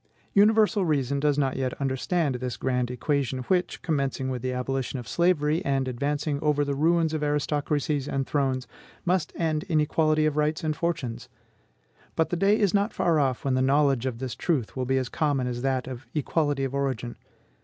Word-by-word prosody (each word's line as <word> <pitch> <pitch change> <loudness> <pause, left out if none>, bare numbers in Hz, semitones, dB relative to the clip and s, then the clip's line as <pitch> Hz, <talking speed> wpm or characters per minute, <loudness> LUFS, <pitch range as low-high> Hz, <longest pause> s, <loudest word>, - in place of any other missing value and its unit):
Universal 210 0 +4
reason 140 -4 0
does 145 0 +2
not 135 -3 0
yet 130 -2 -2
understand 140 +3 0
this 125 0 -4
grand 125 -2 0
equation, 130 0 -1
which, 180 +6 0
commencing 135 -4 -1
with 125 -2 -3
the 130 +1 -2
abolition 130 +1 -2
of 120 -3 -7
slavery, 170 - +2
and 135 -1 0
advancing 145 +3 -1
over 150 -1 +2
the 140 - -1
ruins 160 +2 +2
of 155 - -1
aristocracies 145 -1 0
and 135 -1 -1
thrones, 130 -3 0 0.4
must 180 -2 +1
end 155 -2 0
in 165 -5 +1
equality 155 0 +2
of 155 -1 0
rights 150 +1 0
and 155 -1 0
fortunes; 125 -9 -3 0.9
but 160 - +1
the - - +1
day 195 +4 +3
is 200 -4 +2
not 205 +2 +2
far 165 -3 +2
off 130 -3 0
when 135 - +1
the 130 - +2
knowledge 135 -2 +3
of 125 -3 -3
this 130 0 -4
truth 145 -10 -1
will 130 -1 -2
be 135 +1 +1
as 130 -1 0
common 145 -2 0
as 120 -1 -3
that 130 -1 0
of 130 -1 -8
equality 145 -1 0
of 135 0 -2
origin. 130 -4 -2
140 Hz, 190 wpm, -26 LUFS, 130-155 Hz, 0.9 s, Universal